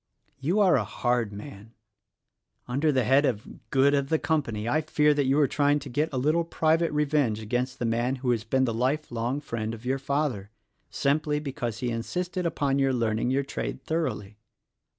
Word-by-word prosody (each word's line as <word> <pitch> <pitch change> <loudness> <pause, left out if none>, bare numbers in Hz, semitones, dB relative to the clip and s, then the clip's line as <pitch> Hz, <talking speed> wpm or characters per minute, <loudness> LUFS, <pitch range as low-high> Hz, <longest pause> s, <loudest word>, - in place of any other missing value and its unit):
You 170 +10 +1
are 185 -7 +5
a 115 - +1
hard 120 +1 -1
man. 105 +1 -10 0.9
Under 140 +5 +1
the 130 -3 +2
head 135 +5 +4
of 115 -7 -4
'Good 135 +1 +4
of 140 -1 +1
the 160 - +3
Company' 120 -10 -1
I 150 +6 +2
fear 150 -1 +3
that 145 -2 0
you 135 +3 +3
are 145 - +4
trying 145 +2 +2
to 145 -1 -7
get 150 +6 0
a 135 - -3
little 155 +6 +2
private 165 0 +1
revenge 145 -7 +1
against 125 +4 -2
the 120 - -2
man 120 +3 0
who 130 -1 -1
has 115 -3 0
been 130 +4 +1
the 115 - -1
life 130 +6 -1
long 120 +4 -1
friend 115 -5 -4
of 115 +2 -14
your 135 +2 0
father 135 -7 -1 0.2
— - - -46
simply 150 +1 0
because 125 -6 -4
he 125 -1 -1
insisted 180 +10 -2
upon 140 -4 0
your 135 -1 +2
learning 115 -1 0
your 135 +2 +1
trade 140 - -5
thoroughly." 110 -11 -3
135 Hz, 195 wpm, -27 LUFS, 115-150 Hz, 0.9 s, are